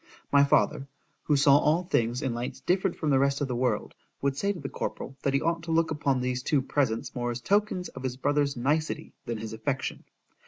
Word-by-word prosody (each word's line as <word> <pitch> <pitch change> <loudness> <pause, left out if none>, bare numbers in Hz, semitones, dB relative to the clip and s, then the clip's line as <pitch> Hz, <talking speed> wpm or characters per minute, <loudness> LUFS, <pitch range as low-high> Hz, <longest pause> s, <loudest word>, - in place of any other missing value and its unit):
My 140 0 +6
father, 140 -1 +2 0.4
who 150 - +3
saw 140 0 +6
all 160 +5 +2
things 120 -8 0
in 130 -3 0
lights 120 +1 -4
different 190 0 0
from 155 - 0
the 135 - +4
rest 140 0 +2
of 145 - -1
the 125 - -2
world, 120 -3 0 0.3
would 140 -1 0
say 200 +8 0
to 190 - -6
the 140 - -5
corporal, 135 - -5
that 140 -1 +1
he 140 - +2
ought 165 0 0
to 165 - -3
look 160 0 +2
upon 140 -4 +1
these 125 0 -1
two 135 0 +1
presents 130 -5 -1
more 120 -1 -2
as 120 0 -3
tokens 200 - +1
of 135 - -10
his 130 -1 -3
brother's 145 0 +1
nicety, 150 +6 -1
than 115 -1 -2
his 110 0 -6
affection. 130 +5 -3
140 Hz, 225 wpm, -28 LUFS, 125-155 Hz, 0.4 s, My